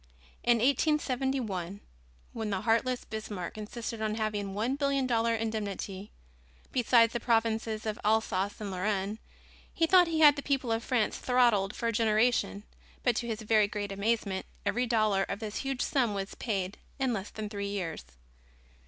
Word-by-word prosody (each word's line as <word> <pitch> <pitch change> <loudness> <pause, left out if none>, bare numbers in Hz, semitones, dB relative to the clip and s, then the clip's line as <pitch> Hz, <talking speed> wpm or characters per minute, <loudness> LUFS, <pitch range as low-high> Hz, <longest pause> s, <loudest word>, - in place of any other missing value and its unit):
In 240 -1 +4
1871, 255 - 0 0.5
when 225 -2 -3
the 195 -2 -1
heartless 240 +2 +1
Bismarck 210 -5 -5
insisted 220 +1 -5
on 215 -1 0
having 215 -2 -2
a - - -6
one 225 +7 -1
billion 275 -2 +1
dollar 230 -2 +2
indemnity, 210 -3 -4 0.6
besides 235 -2 +4
the 240 - -1
provinces 225 -2 0
of 215 -1 -3
Alsace 205 -2 +1
and 205 -2 -4
Lorraine, 200 +2 -1 0.5
he 330 - +2
thought 360 +1 +6
he 320 -1 0
had 295 -2 +8
the - - -2
people 270 -4 -1
of 225 0 0
France 245 -5 0
throttled 235 -6 +3
for - - -4
a 230 - 0
generation, 215 -2 +2 0.4
but 245 -3 +3
to 235 - -2
his 225 -1 -4
very 215 -1 +4
great 205 -1 -4
amazement 200 -1 -1 0.2
every 245 +2 +1
dollar 215 -4 +2
of 200 - -3
this 215 -2 -5
huge 270 -2 -2
sum 240 -7 +1
was 195 0 -4
paid 195 -4 -3 0.2
in 265 -3 0
less 200 -1 -4
than 215 -1 -5
three 200 -1 -4
years. 185 -6 -4
220 Hz, 165 wpm, -30 LUFS, 205-245 Hz, 0.6 s, had